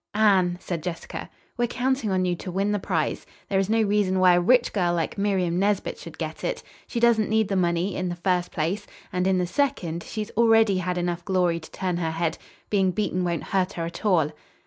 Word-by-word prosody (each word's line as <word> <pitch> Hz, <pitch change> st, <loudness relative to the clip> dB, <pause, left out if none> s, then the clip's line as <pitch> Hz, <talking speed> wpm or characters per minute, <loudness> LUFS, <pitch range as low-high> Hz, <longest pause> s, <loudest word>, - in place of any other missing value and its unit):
"Anne," 190 Hz, -5 st, +4 dB
said 175 Hz, -3 st, -4 dB
Jessica, 175 Hz, 0 st, -6 dB, 0.3 s
"we're 240 Hz, 0 st, +1 dB
counting 255 Hz, -1 st, 0 dB
on 185 Hz, -1 st, +1 dB
you 180 Hz, -1 st, +1 dB
to 180 Hz, -, -7 dB
win 195 Hz, +3 st, 0 dB
the 205 Hz, -, 0 dB
prize. 165 Hz, -5 st, -1 dB, 0.3 s
There 195 Hz, -, +2 dB
is 195 Hz, +1 st, 0 dB
no 225 Hz, 0 st, +3 dB
reason 200 Hz, -2 st, +1 dB
why 185 Hz, -1 st, +6 dB
a 175 Hz, -, +4 dB
rich 245 Hz, +6 st, +3 dB
girl 175 Hz, -4 st, +1 dB
like 165 Hz, -2 st, -2 dB
Miriam 190 Hz, -4 st, 0 dB
Nesbit 200 Hz, 0 st, 0 dB
should -, -, -10 dB
get -, -, -5 dB
it. -, -, -2 dB, 0.2 s
She 235 Hz, -, -3 dB
doesn't 230 Hz, -2 st, +3 dB
need 220 Hz, -1 st, +2 dB
the 195 Hz, -, 0 dB
money, 175 Hz, +1 st, +1 dB
in 185 Hz, -1 st, -2 dB
the 175 Hz, -, -3 dB
first 180 Hz, 0 st, 0 dB
place; 180 Hz, +6 st, -2 dB, 0.3 s
and, 180 Hz, 0 st, +1 dB
in 190 Hz, -1 st, +3 dB
the 180 Hz, -, +1 dB
second, 180 Hz, -, -1 dB
she's 215 Hz, +4 st, -5 dB
already 225 Hz, -3 st, +4 dB
had 180 Hz, 0 st, -2 dB
enough 175 Hz, -1 st, -2 dB
glory 180 Hz, -3 st, +1 dB
to 155 Hz, -, -12 dB
turn 180 Hz, -2 st, -2 dB
her 165 Hz, -2 st, -1 dB
head. 165 Hz, 0 st, -2 dB, 0.3 s
Being 195 Hz, -3 st, +3 dB
beaten 185 Hz, -1 st, -1 dB
won't 170 Hz, -3 st, -1 dB
hurt 190 Hz, 0 st, 0 dB
her 165 Hz, -, -3 dB
at 170 Hz, +1 st, -7 dB
all." 170 Hz, -8 st, +3 dB
185 Hz, 220 wpm, -25 LUFS, 175-210 Hz, 0.3 s, why